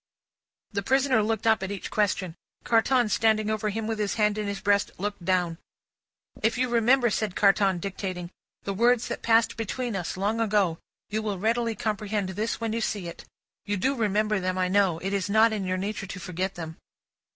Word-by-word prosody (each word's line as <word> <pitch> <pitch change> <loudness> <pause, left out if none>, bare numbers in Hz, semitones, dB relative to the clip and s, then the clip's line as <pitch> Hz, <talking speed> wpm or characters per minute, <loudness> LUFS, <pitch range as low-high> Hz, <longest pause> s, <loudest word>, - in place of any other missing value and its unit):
The 200 -2 -1
prisoner 265 +1 +3
looked 220 0 -1
up, 220 -3 +4
at 190 - -3
each 200 -2 -5
question. 195 -4 0 0.3
Carton, 240 +1 +3
standing 215 0 +2
over 215 0 -1
him 220 +2 -3
with 220 -1 -2
his 205 -1 -1
hand 210 -1 +2
in 210 - -2
his 200 -1 -3
breast, 200 0 +2
looked 200 -1 -4
down. 175 -2 0 0.8
"'If 225 +2 +1
you 255 0 +1
remember,'" 240 +1 +3
said 210 -2 -1
Carton, 195 -2 +3
dictating, 185 -1 -5 0.3
"'the 200 - -2
words 240 +3 +2
that - - -4
passed 225 0 +3
between 235 +1 -3
us, 180 -1 -3
long 210 +4 0
ago, 200 -6 +1 0.3
you 215 +1 0
will 210 -3 -2
readily 230 +3 0
comprehend 210 -2 -2
this 210 +4 -2
when 225 -1 -2
you 230 - -1
see 205 -5 -2
it. 170 - -9 0.4
You 205 0 -1
do 265 +9 +1
remember 215 -3 +1
them, 185 0 -2
I 185 -1 +1
know. 190 -3 +3
It 195 +4 -3
is 200 -1 -1
not 220 +2 +5
in 205 -3 -2
your 185 0 -1
nature 200 +1 -4
to 195 - -7
forget 185 +2 -3
them. 160 -2 -7
210 Hz, 195 wpm, -26 LUFS, 190-225 Hz, 0.8 s, not